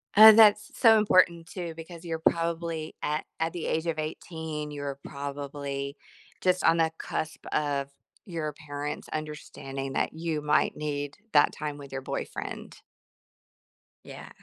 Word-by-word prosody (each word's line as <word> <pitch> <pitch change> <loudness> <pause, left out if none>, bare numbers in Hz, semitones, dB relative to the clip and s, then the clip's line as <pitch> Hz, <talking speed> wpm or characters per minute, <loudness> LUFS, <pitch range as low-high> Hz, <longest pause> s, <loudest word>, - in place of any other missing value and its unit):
Uh, 220 +1 +12
that's 215 -1 +6
so 225 -2 +7
important 180 -5 +4
too, 175 -3 -5
because 165 +1 -10
you're 165 -1 -3
probably 165 -1 0
at 150 +1 -1
at 165 0 0
the 175 -3 -4
age 160 +1 0
of 160 -2 -1
18, 155 -1 -5
you're 145 -1 -4
probably 140 0 -5 0.5
just 185 0 +2
on 165 0 +5
the 160 -1 +3
cusp 155 - -4
of 145 -2 0 0.4
your 165 -6 -3 0.2
parents 145 +1 -4
understanding 135 -3 -5
that - - 0
you 160 -1 -2
might 150 0 +2
need 145 -1 -3 0.2
that 145 -1 +6
time 150 -1 -4
with 140 -1 -11
your 135 0 -4
boyfriend. - - -5 1.3
Yeah. - - -10
155 Hz, 140 wpm, -28 LUFS, 145-170 Hz, 1.3 s, Uh